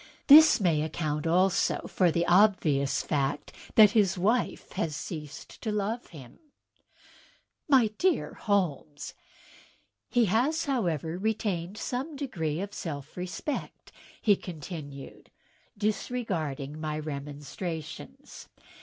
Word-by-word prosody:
This 310 Hz, -1 st, +9 dB
may 170 Hz, -6 st, +2 dB
account 155 Hz, 0 st, -2 dB
also 180 Hz, +3 st, +2 dB
for 180 Hz, -2 st, +2 dB
the 170 Hz, +1 st, 0 dB
obvious 175 Hz, -8 st, +3 dB
fact 145 Hz, -1 st, -2 dB, 0.2 s
that 215 Hz, -2 st, +8 dB
his 200 Hz, -5 st, +2 dB
wife 220 Hz, +7 st, 0 dB
has 155 Hz, -3 st, -2 dB
ceased 150 Hz, -3 st, -8 dB
to 220 Hz, -, -2 dB
love 210 Hz, +3 st, -2 dB
him." 135 Hz, -7 st, -13 dB, 1.3 s
"MydearHoknes!" 210 Hz, -, +1 dB, 1.0 s
"He 240 Hz, -2 st, +3 dB
has, 250 Hz, -, +1 dB
however, 175 Hz, -, -1 dB
retained 205 Hz, -3 st, -2 dB
some 265 Hz, +7 st, -4 dB
degree 170 Hz, -, -3 dB
of 200 Hz, +1 st, -6 dB
self 145 Hz, -6 st, -6 dB
respect," 185 Hz, +11 st, -5 dB, 0.3 s
he 205 Hz, -2 st, +4 dB
con 180 Hz, -2 st, -8 dB
tinued, 145 Hz, -4 st, -9 dB, 0.5 s
disregarding 170 Hz, -, -3 dB
my 155 Hz, -1 st, -2 dB
remonstrances. 155 Hz, -, -7 dB
180 Hz, 100 wpm, -28 LUFS, 150-220 Hz, 1.3 s, This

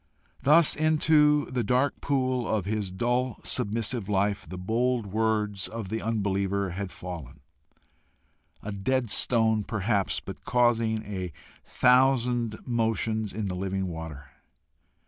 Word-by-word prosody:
Thus 155 Hz, +3 st, +5 dB
into 150 Hz, -1 st, +4 dB
the 125 Hz, -2 st, 0 dB
dark 125 Hz, +6 st, +1 dB
pool 130 Hz, -3 st, 0 dB
of 105 Hz, -4 st, -1 dB
his 105 Hz, -1 st, -2 dB
dull 120 Hz, +6 st, -1 dB
submissive 115 Hz, -2 st, -1 dB
life, 100 Hz, 0 st, 0 dB
the 90 Hz, -, -6 dB
bold 115 Hz, +5 st, 0 dB
words 105 Hz, -1 st, 0 dB
of 110 Hz, -4 st, -6 dB
the 110 Hz, +2 st, -3 dB
unbeliever 100 Hz, -3 st, -1 dB
had 95 Hz, +1 st, -5 dB
fallen 80 Hz, -6 st, -8 dB, 1.2 s
a 105 Hz, -, -5 dB
dead 115 Hz, +4 st, -1 dB
stone 110 Hz, 0 st, +3 dB
perhaps, 100 Hz, -2 st, 0 dB
but -, -, -10 dB
causing 115 Hz, -3 st, +2 dB
a 95 Hz, -4 st, -5 dB, 0.3 s
thousand 125 Hz, -3 st, +2 dB
motions 110 Hz, -2 st, -1 dB
in 110 Hz, -1 st, -4 dB
the 90 Hz, -2 st, -3 dB
living 95 Hz, +1 st, -2 dB
water. 80 Hz, -4 st, -8 dB
110 Hz, 125 wpm, -27 LUFS, 100-125 Hz, 1.2 s, Thus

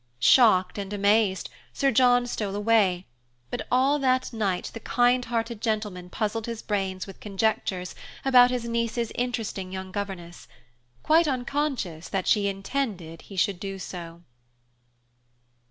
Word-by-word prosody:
Shocked 185 Hz, -, +5 dB
and 195 Hz, 0 st, -5 dB
amazed, 200 Hz, -2 st, +2 dB, 0.2 s
Sir 275 Hz, -1 st, +2 dB
John 245 Hz, +1 st, +4 dB
stole 210 Hz, -4 st, -3 dB
away; 205 Hz, -4 st, +2 dB, 0.5 s
but -, -, -4 dB
all 270 Hz, +4 st, +3 dB
that 255 Hz, -2 st, +1 dB
night 200 Hz, -5 st, -1 dB
the 230 Hz, -, -6 dB
kindhearted 240 Hz, -2 st, 0 dB
gentleman 210 Hz, -5 st, -2 dB
puzzled 215 Hz, +3 st, -2 dB
his 230 Hz, -1 st, -5 dB
brains 190 Hz, -3 st, -2 dB
with 195 Hz, -, -12 dB
conjectures 195 Hz, -3 st, -1 dB, 0.3 s
about 250 Hz, -2 st, +7 dB
his 250 Hz, -2 st, -2 dB
niece's 235 Hz, 0 st, -1 dB
interesting 225 Hz, -6 st, -3 dB
young 190 Hz, 0 st, -6 dB
governess, 185 Hz, -4 st, -6 dB, 0.6 s
quite 325 Hz, +1 st, +4 dB
unconscious 255 Hz, -, -2 dB
that 190 Hz, -2 st, -2 dB
she 205 Hz, -2 st, +3 dB
intended 195 Hz, -5 st, -3 dB
he 200 Hz, -, -12 dB
should 190 Hz, 0 st, +1 dB
do 195 Hz, -1 st, -5 dB
so. 170 Hz, -2 st, -8 dB
210 Hz, 130 wpm, -26 LUFS, 190-245 Hz, 0.6 s, about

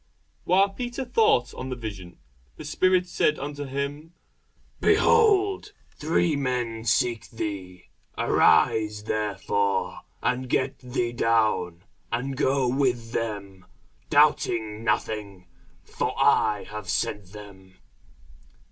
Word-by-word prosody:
While 195 Hz, +3 st, +4 dB
Peter 245 Hz, +5 st, -5 dB
thought 220 Hz, -, +2 dB
on 130 Hz, -, -6 dB
the 130 Hz, -, -3 dB
vision, 100 Hz, -7 st, -8 dB, 0.4 s
the -, -, -9 dB
Spirit 185 Hz, +3 st, +2 dB
said 155 Hz, -3 st, +1 dB
unto 145 Hz, +1 st, -5 dB
him, 140 Hz, +4 st, -5 dB, 0.7 s
Behold, 405 Hz, -2 st, +3 dB, 0.2 s
three 160 Hz, +1 st, +1 dB
men 120 Hz, -5 st, -2 dB
seek 115 Hz, 0 st, +1 dB
thee. 95 Hz, -5 st, -6 dB, 0.3 s
Arise 105 Hz, -1 st, +3 dB
therefore, 100 Hz, -3 st, -1 dB, 0.2 s
and 125 Hz, 0 st, -1 dB
get 130 Hz, +2 st, 0 dB
thee 120 Hz, -2 st, -2 dB
down, 110 Hz, -7 st, +1 dB, 0.3 s
and 130 Hz, +4 st, -2 dB
go 135 Hz, -1 st, +1 dB
with 120 Hz, -3 st, 0 dB
them, 100 Hz, -5 st, -4 dB, 0.4 s
doubting 110 Hz, -1 st, +2 dB
nothing: 100 Hz, -4 st, -2 dB, 0.4 s
for -, -, -3 dB
I 105 Hz, -1 st, +3 dB
have 105 Hz, -3 st, -8 dB
sent 95 Hz, +2 st, -2 dB
them. 95 Hz, -3 st, -13 dB
115 Hz, 105 wpm, -25 LUFS, 105-140 Hz, 0.7 s, While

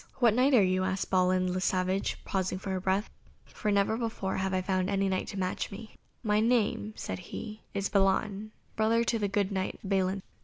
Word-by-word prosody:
"What 240 Hz, -4 st, +4 dB
Knight 260 Hz, +4 st, +4 dB
are 215 Hz, -, +6 dB
you?" 185 Hz, 0 st, +2 dB
asked 190 Hz, +1 st, -2 dB
Balin 185 Hz, -1 st, +2 dB
le 185 Hz, -, -1 dB
Savage, 185 Hz, +1 st, 0 dB
pausing 190 Hz, -1 st, -1 dB
for 190 Hz, 0 st, -3 dB
breath, 190 Hz, +3 st, 0 dB, 0.4 s
"for 210 Hz, -, -4 dB
never 200 Hz, +1 st, +2 dB
before 225 Hz, -5 st, -2 dB
have 190 Hz, 0 st, -1 dB
I 185 Hz, -1 st, 0 dB
found 185 Hz, 0 st, 0 dB
any 195 Hz, -1 st, +1 dB
Knight 190 Hz, -1 st, -1 dB
to 200 Hz, -, -6 dB
match 185 Hz, -1 st, -2 dB
me." 215 Hz, +2 st, -9 dB, 0.3 s
"My 210 Hz, -2 st, +2 dB
name," 220 Hz, -2 st, +1 dB
said -, -, -4 dB
he, 215 Hz, +4 st, -7 dB
"is 200 Hz, 0 st, 0 dB
Balan, 200 Hz, +2 st, +1 dB, 0.2 s
brother 225 Hz, +2 st, +3 dB
to 230 Hz, 0 st, 0 dB
the 205 Hz, -, +1 dB
good 200 Hz, 0 st, 0 dB
Knight 190 Hz, -1 st, -2 dB
Balin." 190 Hz, -1 st, 0 dB
195 Hz, 195 wpm, -30 LUFS, 185-215 Hz, 0.4 s, are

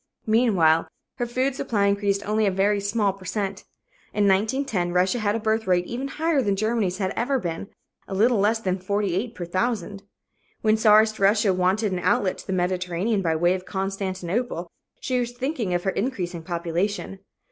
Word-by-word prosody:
Meanwhile 200 Hz, -9 st, +3 dB, 0.3 s
her 240 Hz, -2 st, -1 dB
food 255 Hz, +3 st, 0 dB
supply 210 Hz, -5 st, 0 dB
increased 200 Hz, 0 st, 0 dB
only 215 Hz, 0 st, +2 dB
a -, -, +2 dB
very 200 Hz, +2 st, +2 dB
small 200 Hz, 0 st, 0 dB
per 195 Hz, -1 st, -15 dB
cent. 195 Hz, 0 st, -3 dB, 0.5 s
In 205 Hz, -1 st, +3 dB
1910, 205 Hz, -2 st, +1 dB
Russia 185 Hz, +7 st, +2 dB
had 210 Hz, -1 st, 0 dB
a -, -, -1 dB
birth 220 Hz, 0 st, 0 dB
rate 180 Hz, -1 st, +2 dB
even 250 Hz, +6 st, -4 dB
higher 315 Hz, 0 st, 0 dB
than 200 Hz, -5 st, +1 dB
Germany's 215 Hz, -3 st, 0 dB
had 190 Hz, -1 st, -1 dB
ever 265 Hz, +4 st, +1 dB
been 175 Hz, -4 st, -4 dB, 0.4 s
a 195 Hz, -, -4 dB
little 225 Hz, +3 st, +3 dB
less 210 Hz, +3 st, +3 dB
than 185 Hz, -3 st, -1 dB
48 200 Hz, +3 st, -1 dB
per 175 Hz, -, -5 dB
thousand. 200 Hz, +1 st, -2 dB, 0.6 s
When 215 Hz, 0 st, +4 dB
czarist 215 Hz, 0 st, +4 dB
Russia 200 Hz, 0 st, +3 dB
wanted 190 Hz, +3 st, +1 dB
an 180 Hz, -, -1 dB
outlet 200 Hz, 0 st, +1 dB
to -, -, -11 dB
the -, -, -3 dB
Mediterranean 180 Hz, +3 st, 0 dB
by 165 Hz, -3 st, 0 dB
way 175 Hz, +3 st, +3 dB
of 185 Hz, 0 st, -5 dB
Constantinople, 190 Hz, 0 st, -3 dB, 0.3 s
she 255 Hz, -1 st, -1 dB
was 240 Hz, 0 st, -2 dB
thinking 245 Hz, -, -2 dB
of 175 Hz, 0 st, 0 dB
her 190 Hz, -, +1 dB
increasing 185 Hz, -7 st, -3 dB
population. 175 Hz, +4 st, -3 dB
200 Hz, 180 wpm, -24 LUFS, 185-225 Hz, 0.6 s, When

